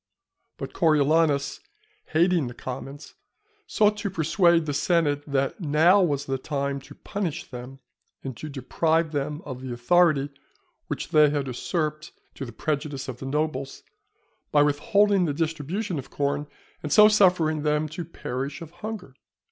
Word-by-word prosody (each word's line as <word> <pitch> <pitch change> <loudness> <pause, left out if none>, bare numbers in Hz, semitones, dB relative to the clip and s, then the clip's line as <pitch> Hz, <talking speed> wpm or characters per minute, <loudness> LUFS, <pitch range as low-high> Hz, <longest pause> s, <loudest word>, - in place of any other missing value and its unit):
But - - -6
Coriolanus, 150 -3 +2 0.5
hating 170 -2 +2
the 120 - -8
commons, 135 +3 -7 0.5
sought 210 0 +2
to 205 - -2
persuade 170 -1 +3
the 145 - -2
senate 145 -2 +1
that 140 +3 -1
now 165 +5 +4
was 145 -5 0
the 135 -1 -2
time 140 0 -2
to 140 +2 -14
punish 195 -7 -4
them, 125 +1 -9 0.5
and 130 -2 -5
to 155 - -7
deprive 160 +4 0
them 150 +1 -3
of 130 -3 -7
the 130 -1 -6
authority 145 +3 +3 0.6
which - - -4
they 150 -1 +6
had 145 -1 -1
usurped 155 +4 -3 0.2
to 135 - -6
the 120 - -8
prejudice 140 +2 -3
of 125 -2 -6
the 135 - -6
nobles, 140 -2 -2 0.7
by 145 -1 +5
withholding 190 +7 +3
the 145 -3 -1
distribution 165 +3 -2
of 130 - -9
corn, 145 +1 -1 0.3
and 150 - -5
so 210 +6 +8
suffering 180 -7 +3
them 150 +1 +1
to 165 +4 -5
perish 140 -3 -5
of 160 - -11
hunger. 205 -6 -7
150 Hz, 150 wpm, -25 LUFS, 140-170 Hz, 0.7 s, so